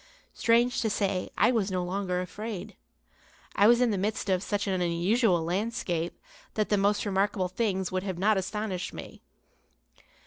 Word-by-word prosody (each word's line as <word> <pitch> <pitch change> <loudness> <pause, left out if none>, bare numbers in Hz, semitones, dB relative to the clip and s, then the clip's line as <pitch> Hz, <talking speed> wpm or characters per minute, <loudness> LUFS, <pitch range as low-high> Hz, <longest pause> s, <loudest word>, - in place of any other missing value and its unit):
Strange 235 +2 +2
to 225 - +1
say, 195 -3 -1
I - - +5
was 215 -5 +1
no 185 -1 -1
longer 180 0 -2
afraid. 205 +2 -6 0.8
I 205 - +5
was 240 +1 +5
in 245 -2 +3
the 200 - -1
midst 205 0 -1
of 185 -1 +2
such 205 +1 -2
an 190 -3 -1
unusual 175 +2 +2
landscape 175 -2 -2 0.4
that 215 -1 0
the 210 - +3
most 205 +2 +1
remarkable 195 -1 0
things 190 -2 -1
would 185 0 -1 0.2
not 195 +4 +2
have 215 - +4
astonished 190 -1 -3
me. - - -9
200 Hz, 165 wpm, -28 LUFS, 185-215 Hz, 0.8 s, I